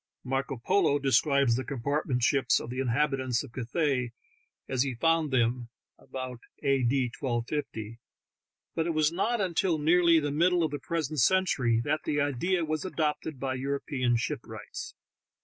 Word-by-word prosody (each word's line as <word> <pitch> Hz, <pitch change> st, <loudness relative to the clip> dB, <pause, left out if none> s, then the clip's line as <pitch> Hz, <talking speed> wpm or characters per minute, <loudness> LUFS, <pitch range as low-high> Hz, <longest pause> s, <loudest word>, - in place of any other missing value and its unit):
Marco 135 Hz, +1 st, -2 dB
Polo 145 Hz, +4 st, +2 dB
describes 140 Hz, -2 st, +3 dB
the 130 Hz, -, -2 dB
compartment 140 Hz, -1 st, -1 dB
ships 135 Hz, +2 st, +3 dB
of 120 Hz, -, -7 dB
the 130 Hz, -, -4 dB
inhabitants 130 Hz, -1 st, 0 dB
of 140 Hz, -, -11 dB
Cathay 130 Hz, -1 st, -1 dB, 0.5 s
as 130 Hz, -2 st, 0 dB
he 135 Hz, -2 st, 0 dB
found 165 Hz, +4 st, +2 dB
them 120 Hz, -2 st, 0 dB, 0.3 s
(about 130 Hz, -2 st, -7 dB, 0.2 s
A. 135 Hz, -2 st, +2 dB
D. 125 Hz, 0 st, +1 dB
1250), 120 Hz, -3 st, -3 dB, 0.7 s
but 165 Hz, 0 st, -1 dB
it 165 Hz, -, -1 dB
was 155 Hz, 0 st, +3 dB
not 220 Hz, +7 st, 0 dB
until 180 Hz, -2 st, +1 dB
nearly 165 Hz, +2 st, +4 dB
the 145 Hz, -2 st, -2 dB
middle 175 Hz, +3 st, +3 dB
of 155 Hz, -, 0 dB
the 145 Hz, -, -4 dB
present 155 Hz, -3 st, -2 dB
century 130 Hz, -7 st, +3 dB
that 155 Hz, +3 st, 0 dB
the 145 Hz, -1 st, -1 dB
idea 160 Hz, +6 st, 0 dB
was 155 Hz, -1 st, -2 dB
adopted 155 Hz, -4 st, -2 dB
by 135 Hz, -1 st, -2 dB
European 130 Hz, -2 st, -1 dB
shipwrights. 115 Hz, -, -6 dB
140 Hz, 150 wpm, -28 LUFS, 125-155 Hz, 0.7 s, nearly